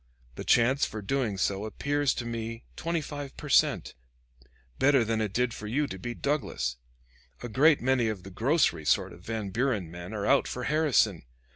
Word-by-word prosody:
The -, -, -7 dB
chance 130 Hz, +4 st, +3 dB
for 110 Hz, -1 st, -2 dB
doing 115 Hz, -2 st, -1 dB
so 100 Hz, +1 st, 0 dB
appears 145 Hz, +6 st, 0 dB
to 120 Hz, -, -4 dB
me 115 Hz, 0 st, -5 dB
twenty 170 Hz, -1 st, -1 dB
five 145 Hz, -2 st, -7 dB
per 150 Hz, -, -7 dB
cent, -, -, +3 dB, 0.9 s
better 135 Hz, -2 st, +5 dB
than 110 Hz, 0 st, 0 dB
it 105 Hz, -3 st, -1 dB
did 125 Hz, +2 st, 0 dB
for 105 Hz, -, -7 dB
you 140 Hz, +7 st, +1 dB
to 95 Hz, -8 st, -7 dB
beat 120 Hz, +5 st, -6 dB
Douglas. 65 Hz, -, -1 dB, 0.7 s
A -, -, -3 dB
great 145 Hz, +6 st, +4 dB
many 130 Hz, -2 st, +2 dB
of 105 Hz, -4 st, -3 dB
the 95 Hz, -, -10 dB
grocery 125 Hz, -, +2 dB
sort 75 Hz, -, +1 dB
of 85 Hz, -, -14 dB
Van 105 Hz, 0 st, -4 dB
Buren 110 Hz, -7 st, -1 dB
men 90 Hz, +2 st, -8 dB
are 105 Hz, -1 st, -2 dB
out 140 Hz, -, +3 dB
for 125 Hz, -, -4 dB
Harrison. 140 Hz, -, +2 dB
120 Hz, 185 wpm, -28 LUFS, 105-140 Hz, 0.9 s, better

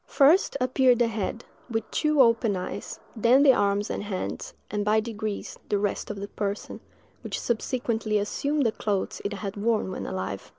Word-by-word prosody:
First 295 Hz, +2 st, +4 dB
appeared 255 Hz, 0 st, +4 dB
the 240 Hz, 0 st, +3 dB
head, 225 Hz, +1 st, -3 dB, 0.2 s
with 225 Hz, -1 st, -3 dB
two 305 Hz, -3 st, +4 dB
open 230 Hz, -3 st, +2 dB
eyes, 180 Hz, -, -5 dB, 0.2 s
then 240 Hz, +5 st, +5 dB
the 275 Hz, -3 st, +7 dB
arms 205 Hz, -2 st, +1 dB
and -, -, -3 dB
hands, 200 Hz, -3 st, -4 dB, 0.2 s
and, 205 Hz, 0 st, -1 dB
by 210 Hz, +1 st, +3 dB
degrees, 215 Hz, -2 st, -5 dB
the 205 Hz, -, +2 dB
rest 200 Hz, 0 st, -2 dB
of 205 Hz, -1 st, -5 dB
the 200 Hz, -, -5 dB
person, 205 Hz, 0 st, -4 dB, 0.4 s
which -, -, -3 dB
subsequently 230 Hz, -2 st, -1 dB
assumed 280 Hz, +8 st, 0 dB
the 225 Hz, -, +3 dB
clothes 205 Hz, -3 st, -2 dB
it 200 Hz, -, -2 dB
had 200 Hz, -1 st, -5 dB
worn 215 Hz, -2 st, 0 dB
when -, -, -5 dB
alive! 95 Hz, +1 st, -4 dB
215 Hz, 175 wpm, -26 LUFS, 205-245 Hz, 0.4 s, the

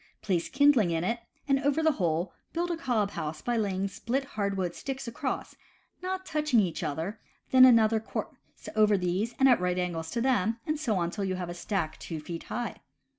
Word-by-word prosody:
Place 175 Hz, -5 st, 0 dB
kindling 270 Hz, -8 st, +4 dB
in 165 Hz, 0 st, 0 dB
it, 230 Hz, +6 st, 0 dB, 0.3 s
and 275 Hz, -1 st, +3 dB
over 290 Hz, +2 st, +1 dB
the 315 Hz, -, +5 dB
hole 175 Hz, -, -1 dB, 0.2 s
build 345 Hz, +1 st, -1 dB
a -, -, 0 dB
cob 240 Hz, -10 st, 0 dB
house 155 Hz, -3 st, -4 dB
by 240 Hz, -, 0 dB
laying 200 Hz, -3 st, 0 dB
split 235 Hz, +7 st, -2 dB
hardwood 195 Hz, -4 st, -1 dB
sticks 270 Hz, +3 st, -5 dB
across, 235 Hz, -, -3 dB, 0.5 s
not 375 Hz, +1 st, -3 dB
touching 300 Hz, -7 st, +2 dB
each 180 Hz, -6 st, 0 dB
other, 165 Hz, +9 st, -3 dB, 0.3 s
then 255 Hz, 0 st, +9 dB
another 225 Hz, -3 st, +5 dB
course 220 Hz, -, -5 dB, 0.4 s
over 215 Hz, -1 st, +5 dB
these 190 Hz, +6 st, -1 dB
and 270 Hz, -, +5 dB
at 245 Hz, -7 st, +5 dB
right 180 Hz, 0 st, 0 dB
angles 170 Hz, -3 st, -2 dB
to 235 Hz, -, -2 dB
them, 230 Hz, -4 st, +2 dB
and 305 Hz, -1 st, -1 dB
so 235 Hz, -9 st, 0 dB
on 170 Hz, -1 st, 0 dB
till 205 Hz, -, -3 dB
you 190 Hz, -1 st, -1 dB
have 180 Hz, -1 st, -4 dB
a -, -, -4 dB
stack 175 Hz, -2 st, -3 dB
two 165 Hz, -2 st, -5 dB
feet 165 Hz, +2 st, -7 dB
high. 240 Hz, -1 st, -4 dB
215 Hz, 200 wpm, -29 LUFS, 180-260 Hz, 0.5 s, then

